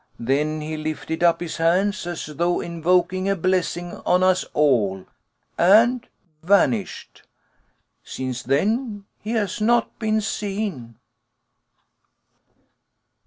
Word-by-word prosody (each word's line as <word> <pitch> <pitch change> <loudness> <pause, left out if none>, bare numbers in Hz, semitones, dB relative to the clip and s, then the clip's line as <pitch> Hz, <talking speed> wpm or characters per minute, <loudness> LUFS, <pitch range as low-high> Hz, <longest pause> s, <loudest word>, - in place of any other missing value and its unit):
Then 150 +6 0
he 155 +1 -5
lifted 155 +1 -4
up 170 0 +3
his 170 -2 -5
hands 180 +4 +1
as 175 -1 -4
though 170 +4 -1
invoking 180 +3 0
a 195 - +2
blessing 175 -1 -1
on 180 +1 +1
us 185 0 +3
all, 105 -11 +1 0.5
and 230 +7 +4 0.3
vanished. 200 +3 0 0.8
Since 130 -1 -5
then 205 - -1
he 220 +2 -5
has 215 -1 -1
not 235 +1 +1
been 220 -1 +1
seen." 200 - -4
175 Hz, 105 wpm, -22 LUFS, 155-205 Hz, 0.8 s, and